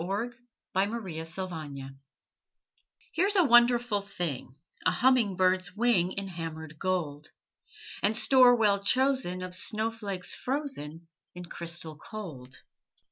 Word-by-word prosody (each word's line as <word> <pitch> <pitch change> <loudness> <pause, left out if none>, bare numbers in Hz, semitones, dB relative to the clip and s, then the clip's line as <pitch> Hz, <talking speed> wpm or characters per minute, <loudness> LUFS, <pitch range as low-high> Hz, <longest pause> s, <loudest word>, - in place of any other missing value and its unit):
THE 200 +7 -2 0.4
FAIRY 190 -4 -1
GOLDSMITH 160 -6 -6 1.2
Here's 390 +5 +2
a 370 - +6
wonderful 240 -4 +4
thing, 165 -10 -5 0.3
A - - +4
humming 245 -6 +3
bird's 185 0 +1
wing 210 -6 +2
In 200 -1 -4
hammered 160 -3 -7
gold, 160 -6 -2 0.7
And 215 +2 +2
store 255 -1 +6
well 210 -4 +3
chosen 255 -5 +1
Of 185 0 -6
snowflakes 215 -2 -2
frozen 210 - -4 0.3
In 180 0 -7
crystal 170 -2 -4
cold. 145 - -9
190 Hz, 110 wpm, -29 LUFS, 165-235 Hz, 1.2 s, a